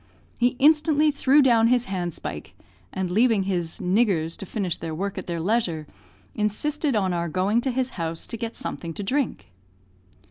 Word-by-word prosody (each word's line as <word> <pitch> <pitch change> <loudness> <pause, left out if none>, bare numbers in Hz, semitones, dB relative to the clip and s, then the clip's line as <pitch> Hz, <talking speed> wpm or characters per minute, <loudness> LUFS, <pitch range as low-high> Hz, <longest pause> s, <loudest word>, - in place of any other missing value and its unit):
He 245 +1 +1
instantly 300 +1 +4
threw 280 0 +4
down 230 -3 +5
his 245 0 +2
handspike, 180 -4 -5 0.4
and 185 -2 -3
leaving 220 0 +3
his 175 -4 -2
"niggers" 180 -4 +1
to 200 -4 -8
finish 185 -5 -2
their 160 -1 -5
work 200 +4 -3
at - - -9
their 170 -1 -3
leisure, 175 -4 0 0.5
insisted 275 +7 0
on 190 -4 +1
our 170 -1 -1
going 195 +8 +1
to 265 - -1
his 255 0 -1
house 165 0 -2
to - - -5
get 230 0 -5
something 165 -2 -5
to 205 - -4
drink. 240 - -2
210 Hz, 170 wpm, -24 LUFS, 175-250 Hz, 0.5 s, down